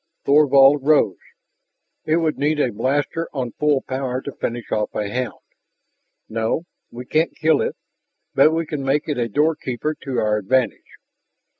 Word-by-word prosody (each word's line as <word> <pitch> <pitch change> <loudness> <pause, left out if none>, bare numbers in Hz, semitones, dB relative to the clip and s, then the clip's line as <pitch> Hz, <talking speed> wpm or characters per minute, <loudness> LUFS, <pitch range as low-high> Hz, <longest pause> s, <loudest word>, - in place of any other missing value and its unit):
Thorvald 140 -1 +6
rose. 140 - +3 0.9
"It 155 +1 +2
would 160 -2 0
need 150 +2 +1
a 130 - +1
blaster 140 +8 -1
on 130 -4 -3
full 150 0 +1
power 130 -1 -3
to 140 - -5
finish 120 -2 -5
off 105 - -1
a 105 - -1
hound. 125 +1 -4 0.8
No, 115 +8 -1 0.3
we 125 +1 -9
can't 155 +5 0
kill 155 -2 +3
it. - - -2 0.6
But - - +6
we 165 +1 -1
can 150 -2 -4
make 135 +2 0
it 145 -5 -2
a 115 -1 -1
doorkeeper 150 0 0
to 135 -3 -4
our 105 -1 +1
advantage." 125 +5 -1
135 Hz, 155 wpm, -21 LUFS, 120-150 Hz, 0.9 s, Thorvald